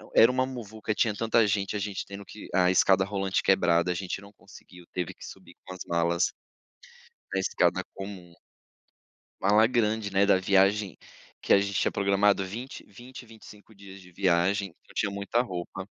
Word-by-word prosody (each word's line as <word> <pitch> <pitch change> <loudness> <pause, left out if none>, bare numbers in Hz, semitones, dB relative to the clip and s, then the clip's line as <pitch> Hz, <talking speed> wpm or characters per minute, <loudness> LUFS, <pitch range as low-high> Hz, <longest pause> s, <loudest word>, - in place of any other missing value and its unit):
era 115 +2 +7
uma 130 0 +1
muvuca, 110 -4 -5
tinha 110 0 +1
tanta 115 +1 +2
gente, 100 -1 -1
a - - -1
gente 100 -1 -4
tendo 100 0 -9
que 105 +1 -11
a 90 -1 +4
escada 95 +1 +4
rolante 95 -1 -1
quebrada, 85 -2 +3
a - - 0
gente 95 +1 -4
não 100 0 -14
conseguiu, 90 -3 -16
teve 90 -2 -3
que - - -12
subir - - -13
com 95 - -8
as 95 - -11
malas 85 +1 +1 1.0
na 95 - +1
escada 95 - +1
comum. 95 -3 -9 1.1
Mala 105 +3 +5
grande, 110 -3 0
né, 100 +1 +4
da 100 -2 +4
viagem 95 0 +2 0.5
que - - -3
a 100 - +7
gente 100 0 -2
tinha - - +1
programado 100 0 +2
20- 120 +8 -8
20, 120 +5 -12
25, 110 -1 -15
dias 100 -1 -13
de 90 -1 -16
viagem, 95 +2 +1
então 85 - -23
tinha 100 - 0
muita 100 +4 0
roupa. 95 -4 -6
100 Hz, 175 wpm, -27 LUFS, 95-105 Hz, 1.1 s, era